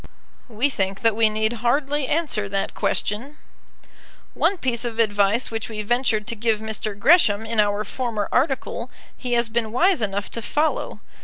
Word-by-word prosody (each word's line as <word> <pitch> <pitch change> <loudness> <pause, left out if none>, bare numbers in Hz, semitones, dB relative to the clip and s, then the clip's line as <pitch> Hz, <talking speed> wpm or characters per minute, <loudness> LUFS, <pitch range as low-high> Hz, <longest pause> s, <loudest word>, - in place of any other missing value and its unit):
We 245 +5 0
think 195 -4 -2
that 225 -2 +3
we 220 -1 +4
need 220 +1 0
hardly 275 +3 +1
answer 290 -11 -1
that 195 0 -1
question. 255 +9 -2 1.0
One 395 - +1
piece 250 -6 -1
of 235 -2 -3
advice 205 +1 +2
which 225 0 -4
we 215 -1 -4
ventured 230 -1 +1
to 230 - -3
give 220 -1 0
Mr. 220 -1 -4
Gresham 220 - +4
in 225 0 -1
our 205 0 +2
former 220 -2 -3
article 270 +1 0 0.3
he 250 -2 -4
has 235 0 +2
been 225 -1 -1
wise 345 - +3
enough 200 -1 -2
to 230 - -2
follow. 300 +7 -1
225 Hz, 165 wpm, -23 LUFS, 210-255 Hz, 1.0 s, we